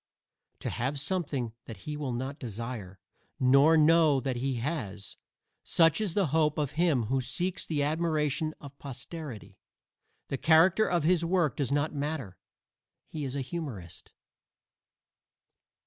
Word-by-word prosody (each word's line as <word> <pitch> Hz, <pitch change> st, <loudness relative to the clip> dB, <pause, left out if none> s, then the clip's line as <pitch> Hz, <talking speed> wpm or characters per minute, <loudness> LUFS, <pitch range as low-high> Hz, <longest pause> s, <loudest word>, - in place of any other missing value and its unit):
To -, -, -3 dB
have 135 Hz, +4 st, -2 dB
something 140 Hz, -8 st, -2 dB
that 110 Hz, -5 st, -9 dB
he 150 Hz, -, -4 dB
will 145 Hz, -3 st, -3 dB
not 130 Hz, +4 st, -4 dB
desire, 115 Hz, -4 st, -6 dB, 0.4 s
nor 140 Hz, +5 st, +6 dB
know 155 Hz, -2 st, +5 dB
that 130 Hz, -1 st, -2 dB
he 130 Hz, +1 st, -1 dB
has 115 Hz, -, -4 dB, 0.5 s
such 165 Hz, +4 st, +3 dB
is 200 Hz, -6 st, -2 dB
the 200 Hz, -2 st, +3 dB
hope 155 Hz, -2 st, +2 dB
of 145 Hz, -3 st, -1 dB
him 155 Hz, -6 st, +2 dB
who 130 Hz, +4 st, 0 dB
seeks 175 Hz, +8 st, -2 dB
the 150 Hz, -3 st, 0 dB
admiration 155 Hz, 0 st, 0 dB
of 140 Hz, -1 st, -12 dB
posterity. 135 Hz, -2 st, -8 dB, 0.7 s
The 135 Hz, -, -3 dB
character 170 Hz, +6 st, +5 dB
of 175 Hz, -3 st, +1 dB
his 170 Hz, +1 st, +3 dB
work 170 Hz, -3 st, +1 dB
does 140 Hz, -3 st, -1 dB
not 145 Hz, +2 st, +1 dB
matter; 140 Hz, -, -4 dB, 0.7 s
he 155 Hz, -, -6 dB
is 135 Hz, -1 st, -4 dB
a 140 Hz, -, -1 dB
humorist. 130 Hz, -, -7 dB
145 Hz, 140 wpm, -29 LUFS, 130-160 Hz, 0.7 s, nor